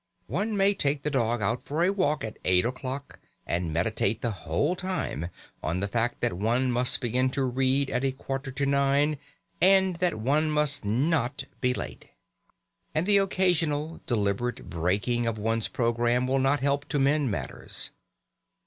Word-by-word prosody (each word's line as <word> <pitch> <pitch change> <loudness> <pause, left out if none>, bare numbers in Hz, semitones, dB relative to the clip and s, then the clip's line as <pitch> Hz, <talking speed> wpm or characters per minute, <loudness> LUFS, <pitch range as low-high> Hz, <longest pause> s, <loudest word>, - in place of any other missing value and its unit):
One 210 0 -2
may 195 +1 +4
take 145 -6 0
the 150 - -1
dog 120 -4 +1
out 115 +5 0
for 155 +4 -1
a 185 - +3
walk 185 -7 0
at 110 -1 -6
eight 90 +2 +3
o'clock, 130 +3 -5 0.3
and 85 -1 -1
meditate 100 +5 0
the 120 - 0
whole 145 - -1
time 180 - -3 0.3
on 85 +3 -1
the 100 - -1
fact 115 +3 -1
that 120 - +1
one 120 +7 +1
must 125 +1 +2
begin 125 +2 +1
to 135 +1 -1
read 130 +2 +1
at 125 - 0
a 135 - +2
quarter 135 +1 -5
to 140 +2 -2
nine, 140 +1 +2 0.4
and 190 -1 +5
that 180 -7 +1
one 145 +8 +1
must 150 -3 +1
not 135 +4 0 0.2
be 125 -1 +1
late. - - -6 0.9
And 155 +3 +2
the 205 0 +5
occasional 165 -5 +1
deliberate 110 +1 -1
breaking 100 +8 0
of 115 -1 -1
one's 115 +1 0
programme 120 +1 +1
will 135 +1 +1
not 135 +2 +2
help 140 +1 +1
to 150 - -2
mend 140 0 +2
matters. 100 - -3
130 Hz, 165 wpm, -27 LUFS, 115-150 Hz, 0.9 s, and